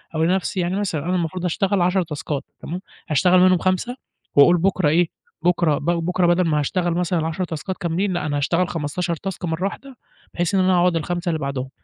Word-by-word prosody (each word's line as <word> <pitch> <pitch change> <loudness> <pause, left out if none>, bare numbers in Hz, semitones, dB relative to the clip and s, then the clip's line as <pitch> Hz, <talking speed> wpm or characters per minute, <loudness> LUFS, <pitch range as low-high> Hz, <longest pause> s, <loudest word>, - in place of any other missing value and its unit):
أقول 160 +1 +2
لنَفسي 190 0 0
يعني 175 +1 0
مثلًا، 165 -7 -2
أنا 180 +1 0
المفروض 180 +1 -2
أشتغل 190 +2 +1
10 180 +1 +2
تاسكات 150 -2 -4 0.2
تمام، 180 +3 -6 0.3
أشتغل 180 +5 +4
منهُم 185 -1 +5
5 185 +8 -1 0.4
وأقُول 175 +5 +7
بُكرة 185 -3 +2
إيه، 170 +2 +3 0.3
بُكرة 170 -4 +2
ب 145 - -7
بُكرة 175 +1 +1
بدَل 175 +1 +3
ما 150 -2 +2
هاشتغل 175 +4 0
مثلًا 180 0 0
ال10 160 +3 -2
تاسكات 175 +2 -4
كاملين 180 +3 -1
لأ 175 - -2
أنا 145 -1 -1
هاشتغل 170 +5 +1
15 170 +2 -2
تاسك 185 +2 -5
مرّة 165 +2 -2
واحدة، 265 +5 -6 0.4
بحيث 175 +3 0
إن - - +3
أنا 185 0 +3
أقعُد 175 -1 +3
ال5 175 +2 -2
اللي 160 -2 -1
بَعدهم 135 -2 -3
175 Hz, 205 wpm, -22 LUFS, 160-185 Hz, 0.4 s, وأقُول